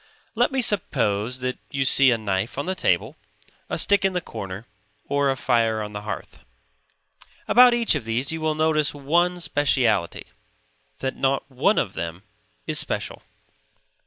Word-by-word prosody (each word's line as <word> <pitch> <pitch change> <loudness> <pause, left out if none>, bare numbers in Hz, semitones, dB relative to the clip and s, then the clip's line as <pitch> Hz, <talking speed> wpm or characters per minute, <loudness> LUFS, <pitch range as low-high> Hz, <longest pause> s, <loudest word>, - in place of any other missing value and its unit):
Let - - +2
me 265 -2 0
suppose 125 - 0
that 125 0 -3
you 135 -1 -1
see 135 +1 +5
a 120 - +2
knife 105 +2 -3
on 140 - -2
the 185 - -1
table, 190 - 0 0.5
a - - -2
stick 200 -1 +3
in 195 -1 +1
the 180 - 0
corner, 100 - -8 0.4
or 140 0 +1
a 135 - 0
fire 115 -4 +1
on 105 0 -8
the 105 - -5
hearth. 105 - -7 1.1
About 245 0 +7
each 235 -1 +1
of 150 -6 -2
these 115 +6 -1
you 160 0 -4
will 155 -1 0
notice 155 -2 +1
one 175 +5 +1
speciality; 130 - +1 0.8
that 130 0 -2
not 135 0 0
one 145 +12 +2
of 100 - 0
them 85 +3 -6 0.4
is - - +1
special. - - -3
135 Hz, 160 wpm, -23 LUFS, 110-160 Hz, 1.1 s, About